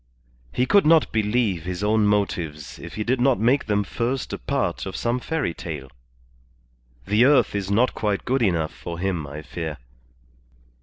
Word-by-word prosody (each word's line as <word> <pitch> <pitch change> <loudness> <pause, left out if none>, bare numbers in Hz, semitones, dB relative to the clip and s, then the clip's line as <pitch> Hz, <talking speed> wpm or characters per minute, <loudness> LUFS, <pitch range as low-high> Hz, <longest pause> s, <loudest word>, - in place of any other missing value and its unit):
He 125 - +1
could 200 +2 +4
not 160 -1 +5
believe 105 -4 +1
his 90 +2 -4
own 105 0 +3
motives 85 -7 -1
if - - -9
he 110 - -2
did 120 +2 0
not 130 -1 +3
make 125 +6 +2
them 105 -1 +1
first 120 +6 -3
a - - -4
part 130 -11 -2
of 95 - -6
some 120 +1 0
fairy 150 - -2
tale. 75 -7 -7 1.1
The 105 +3 +3
earth 140 0 +4
is 100 -2 -2
not 115 +5 +3
quite 105 -2 -1
good 130 +1 +1
enough 85 -7 +1
for 85 -1 -7
him, 90 -4 -2
I 75 +2 -8
fear. 80 0 -5
105 Hz, 170 wpm, -23 LUFS, 85-125 Hz, 1.1 s, not